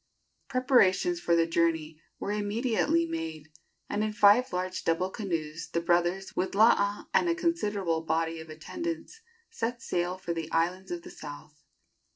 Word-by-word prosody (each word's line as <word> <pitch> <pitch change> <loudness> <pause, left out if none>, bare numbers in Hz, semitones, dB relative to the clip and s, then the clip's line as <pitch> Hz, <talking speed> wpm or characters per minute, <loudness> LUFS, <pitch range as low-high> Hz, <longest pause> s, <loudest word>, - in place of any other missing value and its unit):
Preparations 255 - +3
for 170 - +2
the 165 0 +4
journey 165 -2 0 0.2
were 200 - -3
immediately 210 -5 +1
made, 160 -2 -5 0.4
and 210 - -1
in 215 0 -1
five 210 +5 +5
large 180 -1 -3
double 180 +3 0
canoes 165 -7 -4
the 170 - +1
brothers, 175 +3 0
with 190 +1 -1
Laa 205 -1 +4
and 350 - +3
a 335 - +2
considerable 205 - 0
body 165 0 -1
of 160 0 -10
attendants, 335 - -6 0.3
set 240 - -3
sail 180 -4 -2
for 175 -2 -3
the 165 -1 -5
islands 175 +3 0
of 345 -1 -4
the 355 - -10
south. 150 - -10
180 Hz, 155 wpm, -29 LUFS, 165-215 Hz, 0.4 s, five